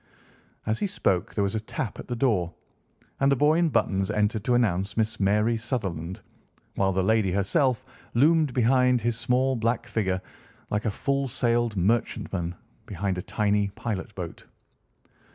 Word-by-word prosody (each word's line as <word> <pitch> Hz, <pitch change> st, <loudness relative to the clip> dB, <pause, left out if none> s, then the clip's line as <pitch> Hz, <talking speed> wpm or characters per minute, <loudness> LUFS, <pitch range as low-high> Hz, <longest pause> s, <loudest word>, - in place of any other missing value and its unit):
As 110 Hz, +1 st, 0 dB
he 205 Hz, -, 0 dB
spoke 95 Hz, -, 0 dB
there 100 Hz, -, +2 dB
was 100 Hz, -, -1 dB
a 110 Hz, -, 0 dB
tap 110 Hz, 0 st, -5 dB
at -, -, -8 dB
the 125 Hz, -, -3 dB
door, 105 Hz, -9 st, +1 dB, 0.6 s
and 135 Hz, 0 st, +3 dB
the -, -, +5 dB
boy 150 Hz, +5 st, +3 dB
in 170 Hz, -1 st, +3 dB
buttons 95 Hz, -8 st, +1 dB
entered 105 Hz, 0 st, 0 dB
to 125 Hz, -, +3 dB
announce 100 Hz, -4 st, +1 dB
Miss 110 Hz, 0 st, 0 dB
Mary 105 Hz, +4 st, +2 dB
Sutherland, 95 Hz, -7 st, -3 dB, 0.5 s
while 95 Hz, 0 st, +1 dB
the 95 Hz, 0 st, +1 dB
lady 110 Hz, -1 st, +2 dB
herself 130 Hz, -, +1 dB, 0.3 s
loomed 155 Hz, +3 st, +4 dB
behind 125 Hz, +1 st, +3 dB
his 120 Hz, +1 st, 0 dB
small 125 Hz, +3 st, +1 dB
black 115 Hz, +1 st, 0 dB
figure 95 Hz, -4 st, -1 dB, 0.5 s
like 105 Hz, +2 st, -1 dB
a -, -, +2 dB
full 140 Hz, +5 st, -1 dB
sailed 120 Hz, -2 st, 0 dB
merchant 110 Hz, +5 st, 0 dB
man 90 Hz, -1 st, -2 dB, 0.3 s
behind 95 Hz, -1 st, -2 dB
a -, -, -2 dB
tiny 105 Hz, +1 st, +1 dB
pilot 110 Hz, -2 st, -4 dB
boat. 90 Hz, -3 st, -7 dB
110 Hz, 165 wpm, -26 LUFS, 95-125 Hz, 0.6 s, the